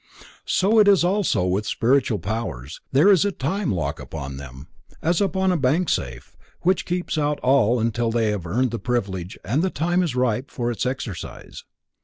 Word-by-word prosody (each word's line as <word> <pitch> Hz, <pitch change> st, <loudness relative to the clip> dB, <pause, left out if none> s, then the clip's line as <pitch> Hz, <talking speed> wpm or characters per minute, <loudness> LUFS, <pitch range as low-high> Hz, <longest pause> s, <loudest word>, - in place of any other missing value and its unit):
So 210 Hz, +4 st, +3 dB
it 210 Hz, -, +6 dB
is 195 Hz, -4 st, +5 dB
also 180 Hz, -, +1 dB
with 95 Hz, +3 st, -1 dB
spiritual 125 Hz, -2 st, +2 dB
powers, 95 Hz, -, -5 dB
there 150 Hz, +10 st, +5 dB
is 190 Hz, -2 st, +5 dB
a 205 Hz, -, +1 dB
time 170 Hz, +4 st, -2 dB
lock 80 Hz, -6 st, -2 dB
upon 70 Hz, 0 st, -7 dB
them, 65 Hz, +1 st, -10 dB, 0.3 s
as 170 Hz, +3 st, +1 dB
upon 190 Hz, -1 st, +1 dB
a 180 Hz, -, +1 dB
bank 155 Hz, +6 st, +1 dB
safe, 65 Hz, +2 st, -3 dB, 0.3 s
which 185 Hz, +1 st, +1 dB
keeps 175 Hz, -2 st, -2 dB
out 150 Hz, 0 st, 0 dB
all 125 Hz, -2 st, +3 dB
until 115 Hz, +1 st, 0 dB
they 115 Hz, -2 st, +1 dB
have 95 Hz, -5 st, -4 dB
earned 120 Hz, +7 st, 0 dB
the 115 Hz, -, -3 dB
privilege 100 Hz, -7 st, -3 dB
and 130 Hz, +10 st, +1 dB
the 190 Hz, -, +1 dB
time 175 Hz, +2 st, 0 dB
is 165 Hz, -8 st, -1 dB
ripe 125 Hz, +1 st, 0 dB
for 120 Hz, -1 st, -2 dB
its 120 Hz, +2 st, -2 dB
exercise. 120 Hz, -, -6 dB
125 Hz, 185 wpm, -23 LUFS, -, 0.3 s, it